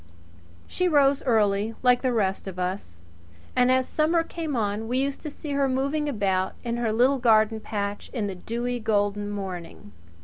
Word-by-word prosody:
She 365 - -1
rose 285 -4 +4
early, 215 -1 +2
like 250 -1 +4
the 255 - +1
rest 195 -4 -1
of 185 -1 -6
us; 180 - -4 0.5
and 250 0 +4
as 260 0 +2
summer 325 +2 +2
came 325 -4 -4
on 215 -1 -1
we 250 +2 -1
used 275 +1 -1
to 305 - -5
see 295 0 -7
her 280 -1 +1
moving 280 +3 0
about 190 -6 0
in 235 -1 -2
her 235 -2 0
little 255 +5 +3
garden 220 -2 +4
patch 205 -1 -4
in 230 -6 -2
the 200 - -3
dewy, 240 +6 -3
golden 205 -2 0
morning. 185 - -7
230 Hz, 175 wpm, -25 LUFS, 205-270 Hz, 0.5 s, rose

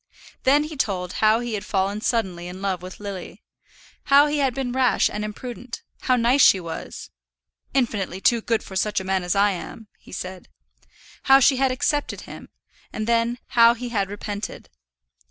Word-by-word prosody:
Then 285 +3 +5
he 305 +1 -7
told 185 -8 -2
how 220 +2 +4
he 240 -2 -4
had 205 -1 -3
fallen 200 +1 -1
suddenly 190 -8 -1
in 180 +1 -8
love 190 -3 -2
with 185 +1 -9
Lily, 200 -3 -8 0.6
how 280 +1 +6
he 295 0 -1
had 265 -3 +1
been 265 -2 -2
rash 255 0 +2
and 210 - -4
imprudent, 240 +3 -7 0.2
how 255 - +2
nice 245 +3 +3
she 195 - +7
was 165 -2 -7 0.6
"infinitely 210 -8 0
too 235 +3 +3
good 230 0 0
for 190 - -10
such 210 +2 0
a - - -6
man 190 0 0
as 180 +2 -1
I 200 +1 +4
am," 205 +4 -8
he - - -17
said; 185 0 -7 0.8
how 270 0 +7
she 270 0 +4
had 265 0 +2
accepted 290 +3 -1
him, - - -11 0.4
and 215 - -4
then 235 +1 +1
how 235 -1 +6
he 245 +1 -6
had 200 -4 -1
repented. 205 - -6
220 Hz, 180 wpm, -23 LUFS, 195-250 Hz, 0.8 s, she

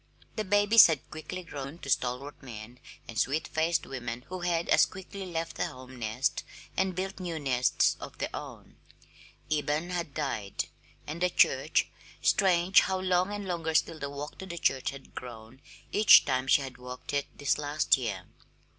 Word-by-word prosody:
The 215 - -1
babies 205 +3 +7
had 155 -5 -3
quickly 180 +4 -6
grown 145 -2 -7
to 140 - -9
stalwart 125 +4 -1
men 120 -1 -10 0.3
and 115 - -4
sweet 155 +4 0
faced 160 0 0
women 125 -2 -5
who 185 0 -5
had 170 -1 0
as - - +6
quickly 190 +1 -8
left 165 -1 -4
the - - 0
home 130 0 -11
nest 115 +4 -1 0.3
and 190 -1 0
built 190 +2 -4
new 175 -3 -4
nests 130 -4 +2
of - - -9
their - - -3
own. - - -9 0.7
Eben 150 +3 0
had 170 -5 -3
died; 115 -10 -3 0.4
and 155 +3 -6
the 180 - +3
church - - +3 0.3
strange 185 -1 +4
how 190 0 -1
long 185 +1 +1
and 205 -1 -5
longer 165 -3 -2
still 160 0 +2
the 140 - -4
walk 145 +1 -7
to 190 - -7
the 175 -2 -6
church 135 -5 +1
had 140 -1 -11
grown 120 +1 -10 0.3
each 210 -2 +8
time 130 -1 0
she 140 - +4
had 130 -2 -8
walked 125 +2 -8
it 140 -1 0
this 145 -1 +1
last 145 -1 +2
year! 105 -9 -4
150 Hz, 175 wpm, -29 LUFS, 130-180 Hz, 0.7 s, each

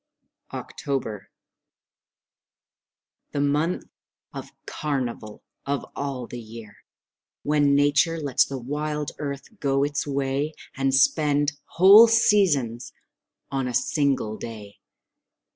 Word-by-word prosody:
October 115 -8 -5 2.0
The 145 - -1
month 150 +5 0 0.5
of - - -7 0.2
carnival 125 -7 -4 0.2
of 140 0 -2
all 135 -3 -4
the 120 - -8
year, 110 -2 -11 0.7
When 145 -1 +3
Nature 145 +4 +2
lets 140 -4 +2
the 135 - -5
wild 150 +3 -3
earth 140 +8 -6
go 135 -2 +1
its 145 0 -2
way 140 +2 -2 0.2
And 135 0 0
spend 145 +1 +3 0.2
whole 200 +6 +9
seasons 180 - +2 0.6
on 135 -2 -1
a 125 - -3
single 135 -6 0
day. 105 -3 -9
140 Hz, 100 wpm, -24 LUFS, 125-150 Hz, 2.0 s, whole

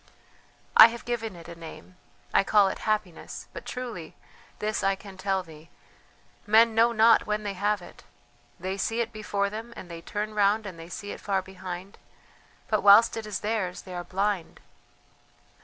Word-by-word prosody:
"I - - +12
have 235 0 -8
given 225 -4 -3
it 170 -1 -12
a 170 - -8
name. 165 +2 -11 0.4
I - - +5
call 200 -1 +4
it - - -5
Happiness; 205 -6 -3
but - - -9
truly 235 -11 -6 0.4
this 210 -1 -2
I 195 0 +2
can 195 0 -12
tell 190 0 -1
thee: 160 -1 -15 0.8
men 225 +2 +6
know 230 +2 +4
not 225 0 +5
when 210 0 -1
they 205 -1 -3
have 205 0 0
it... 175 - -14 0.6
they 190 +2 -3
see 225 +3 -1
it 230 0 -4
before 200 -2 -2
them, 225 +2 -7
and 180 - -10
then 170 - -6
they - - -11
turn 210 +4 -4
round 210 +1 +2
and 180 -4 -8
they 165 +1 -10
see 205 +3 -6
it - - -8
far 195 -2 0
behind... 185 0 -8 0.7
but 215 -1 +1
whilst 205 +3 +7
it 225 -1 -5
is 210 - -4
theirs 210 -4 -2
they 185 - -9
are 175 0 -4
blind. 190 0 -2
200 Hz, 185 wpm, -27 LUFS, 185-215 Hz, 0.8 s, I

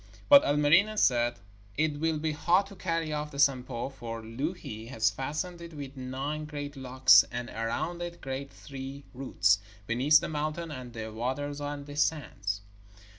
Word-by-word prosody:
But 285 -1 +10
Ilmarinen 155 +9 +4
said: 120 - +3 0.4
'It 150 -2 +1
will 160 0 +1
be 155 +1 -1
hard 175 +6 +3
to 200 0 -12
carry 165 -4 -1
off 150 0 -2
the 140 - -10
Sampo, 130 -3 +1
for 115 -4 -7
Louhi 115 -2 -5
has 110 -4 +1
fastened 155 - -4
it 170 -2 -9
with 140 -1 -7
nine 135 +4 -4
great 145 -1 -6
locks, 130 -1 +6
and 120 0 -4
around 115 +10 -2
it 175 0 -5
grow 135 +1 -4
three 135 0 -8
roots, 105 -6 +2 0.3
beneath 130 +8 +5
the - - -4
mountain 155 +2 -3
and 130 -4 -7
the 110 -2 -6
waters 140 +5 -3
and 145 0 -4
the 145 0 -9
sands.' 115 -10 -1
145 Hz, 165 wpm, -29 LUFS, 125-155 Hz, 0.4 s, But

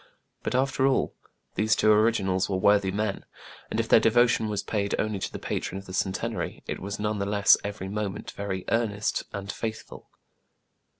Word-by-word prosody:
But, - - -2
after 130 +1 +2
all, 135 - +1 0.4
these 110 0 +2
two 110 - +4
originals 105 -4 +2
were 95 - 0
worthy 100 0 +4
men; 100 +1 -2 0.5
and, - - -2
if - - 0
their - - +7
devotion 115 -1 +3
was 105 -1 -2
paid 100 -2 -1
only 105 -2 -1
to - - -3
the - - -5
patron 95 - -3
of 95 - -8
the 95 - -9
Centenary, 95 0 -2
it - - -4
was 100 +2 -5
none 105 0 -1
the 100 - -1
less 100 0 +6
every 100 -1 -5
moment 100 0 -4
very 95 -2 -4
earnest 110 -2 0
and 100 -1 -5
faithful. 110 +1 -6
105 Hz, 180 wpm, -27 LUFS, 100-110 Hz, 0.5 s, their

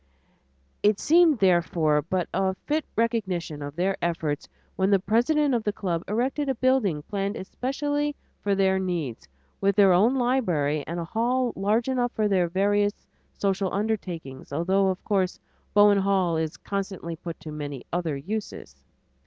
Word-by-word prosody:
It 205 0 +3
seemed, 330 -2 +5
therefore, 170 -5 +3
but 180 +4 -2
a 190 +1 +1
fit 305 +1 0
recognition 190 -10 -1
of 145 0 -6
their 190 +3 0
efforts 160 -4 -2 0.3
when 190 0 +1
the 200 - +5
president 250 +9 +2
of 235 -2 0
the 210 - 0
club 180 -5 -2
erected 260 +7 -1
a 265 - +1
building 230 - +1
planned 200 +3 -3
especially 290 +7 -2 0.3
for 200 -1 +1
their 190 -1 +2
needs, 170 - -3 0.3
with 195 0 +2
their 200 -3 +6
own 215 +9 +4
library 180 - +1
and 170 +1 -3
a 170 - -3
hall 240 +6 0
large 210 +5 +1
enough 250 -2 0
for 215 -1 +1
their 185 -3 +2
various 205 +3 +1 0.3
social 195 -1 0
undertakings, 185 -11 -3
although 190 +6 +2
of 190 0 -2
course 190 -3 0 0.4
Bowen 205 -1 +6
Hall 190 -3 +1
is 160 -1 -2
constantly 190 -4 -4
put 165 0 -8
to 155 0 -8
many 145 -4 -6
other 170 -5 -1
uses. 205 +9 -6
195 Hz, 155 wpm, -26 LUFS, 170-225 Hz, 0.4 s, their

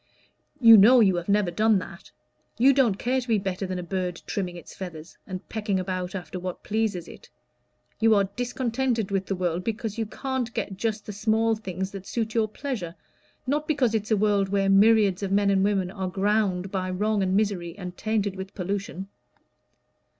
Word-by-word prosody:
You 230 -3 +9
know 235 +6 +7
you 195 -5 +4
have 175 +2 -5
never 200 -3 +2
done 215 +4 +3
that. 185 -1 -8 0.5
You 265 +4 +6
don't 245 -8 +3
care 255 +4 0
to 250 - -10
be 225 -2 +3
better 195 -1 -3
than 185 0 -3
a 180 - -4
bird 180 -1 -3
trimming 180 -3 -3
its 175 - -11
feathers, 170 -4 -8
and 185 -1 -7
pecking 210 -3 -2
about 185 0 -3
after 180 0 -6
what 180 0 -6
pleases 210 -5 -1
it. - - -13 0.7
You 225 -1 +5
are 200 - +4
discontented 245 -3 -1
with 195 -1 -1
the 195 - -1
world 180 -1 -1
because 225 0 -3
you 225 - -1
can't 260 +1 -3
get 195 - -3
just 215 +1 -2
the 210 - -6
small 220 +2 +1
things 190 -2 -5
that 195 -1 -9
suit 225 -2 -2
your 225 -2 +2
pleasure, 210 - -5 0.5
not 295 +3 -1
because 275 -7 +1
it's 215 -1 -1
a 220 - +3
world 200 -1 +2
where 195 0 +1
myriads 205 -1 +5
of 195 -1 -3
men 200 0 +3
and 195 -1 +3
women 195 -3 0
are 190 -2 -4
ground 195 -1 0
by 185 -2 -2
wrong 205 +3 0
and 190 0 +1
misery, 190 -5 -1
and 180 -2 -7
tainted 210 -2 -1
with 190 0 -8
pollution." 195 0 -4
200 Hz, 195 wpm, -25 LUFS, 185-220 Hz, 0.7 s, You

